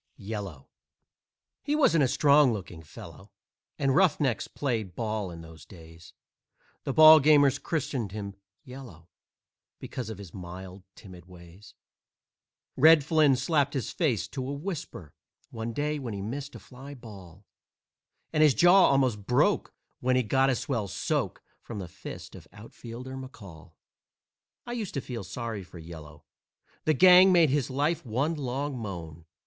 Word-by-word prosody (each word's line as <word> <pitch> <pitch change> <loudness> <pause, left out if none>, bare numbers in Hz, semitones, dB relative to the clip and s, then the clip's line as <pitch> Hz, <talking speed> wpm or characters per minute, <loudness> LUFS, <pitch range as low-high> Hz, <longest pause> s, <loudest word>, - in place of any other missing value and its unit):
"YELLOW" 100 -9 -7 0.9
He 295 +1 -1
wasn't 165 - +3
a - - +3
strong 145 +1 +4
looking 90 -6 -7
fellow, 95 +5 -13 0.5
And 135 -1 +1
roughnecks 150 -8 +2
played 110 -10 -3
ball 110 -4 -3
in 85 -1 -9
those 80 -1 -13
days; 80 -2 -15 0.7
The - - -1
ballgamers 150 -2 +7
christened 130 - -3
him 100 -1 -6 0.3
"Yellow" 125 -11 -12 0.7
Because 125 -3 -6
of 110 - -7
his 100 -5 -11
mild, 95 +1 -9
timid 90 -4 -13
ways. 90 +3 -16 1.0
Red 155 +1 +6
Flynn 150 -2 +3
slapped 140 +2 0
his 130 - -3
face 125 - -1
to 130 -2 -5
a - - -3
whisper 145 - -7 0.4
One 115 0 -5
day 150 +4 -2
when 120 -6 -5
he 100 - -5
missed 140 +6 -6
a - - -9
fly 135 +3 -12
ball, 100 -6 -13 0.9
And 155 - +2
his 150 -4 +5
jaw 180 +2 +6
almost 125 -7 +1
broke 125 - +2 0.3
when 130 +1 +1
he 130 - +2
got 135 +5 +2
a 130 - +2
swell 115 -5 -3
soak - - -3 0.2
From 115 - -8
the 95 -3 -6
fist 90 +3 -10
of - - -13
Outfielder 120 +4 -10
McCall. 100 - -11 0.9
I 240 - -7
used 225 -8 -5
to - - 0
feel 120 -5 -6
sorry 105 +3 -5
for 90 - -14
"Yellow," 80 -3 -12 0.6
The 155 - +2
gang 185 +4 +7
made 170 -6 +4
his 140 -3 0
life 145 +5 -1
one 135 +7 -1
long 140 -1 -4
moan. 85 -8 -7
125 Hz, 150 wpm, -27 LUFS, 95-145 Hz, 1.0 s, ballgamers